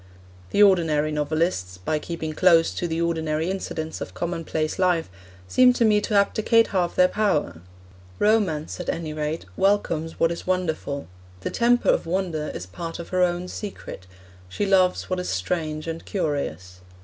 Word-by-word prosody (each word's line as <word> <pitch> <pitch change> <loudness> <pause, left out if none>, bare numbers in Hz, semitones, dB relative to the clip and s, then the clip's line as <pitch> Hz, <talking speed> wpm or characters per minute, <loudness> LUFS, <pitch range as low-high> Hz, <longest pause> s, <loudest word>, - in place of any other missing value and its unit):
The 210 - +4
ordinary 160 -6 +3
novelists, 150 - -1
by 150 +12 -2
keeping 160 -1 -5
close 165 -1 +4
to 175 - -2
the 165 0 -2
ordinary 160 0 0
incidents 160 -4 -4
of - - -6
commonplace 165 -2 -2
life, 180 - +1 0.4
seem 250 - +5
to 235 - +2
me 210 -1 +4
to 210 - -2
abdicate 220 +3 +3
half 180 -4 0
their 180 - +6
power. 155 - 0 0.6
Romance, 195 -9 +1
at 180 - -4
any 160 -2 -3
rate, 155 +1 -3
welcomes 175 -5 0
what 165 - +3
is 170 - -6
wonderful; 160 -6 -2 0.3
the - - -3
temper 240 +1 +2
of - - +2
wonder 170 -4 -1
is - - -5
part 165 - -6
of 170 - -8
her 185 0 0
own 175 0 +1
secret; 185 - -8 0.4
she 205 - -2
loves 185 -2 +3
what 185 -1 -2
is 180 - -3
strange 155 - -2
and 165 0 -5
curious. 95 - -3
170 Hz, 160 wpm, -24 LUFS, 155-185 Hz, 0.6 s, their